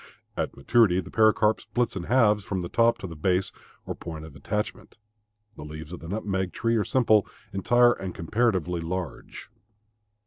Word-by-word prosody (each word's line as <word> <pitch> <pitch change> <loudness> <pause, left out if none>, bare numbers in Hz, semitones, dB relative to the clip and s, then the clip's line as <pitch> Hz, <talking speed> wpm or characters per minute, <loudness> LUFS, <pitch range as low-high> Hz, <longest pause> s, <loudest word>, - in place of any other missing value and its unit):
At - - -3
maturity 95 +4 +3
the - - -7
pericarp 110 0 +3
splits 120 -3 -1
in 90 -3 -4
halves 105 -4 +3
from 95 -1 -3
the 85 - -5
top 115 0 +3
to - - -8
the 85 -3 -7
base 90 +4 0 0.3
or - - -3
point 80 -1 -8
of 80 -3 -13
attachment. 105 +10 -4 0.6
The - - -9
leaves 75 +2 -8
of 90 - -6
the 80 - -10
nutmeg 95 -3 -2
tree 115 0 0
are 105 - +2
simple, 110 -3 +3 0.3
entire, 120 +5 +4
and 95 -5 -6
comparatively 90 -3 0
large. 85 -2 -6
95 Hz, 170 wpm, -26 LUFS, 85-110 Hz, 0.6 s, entire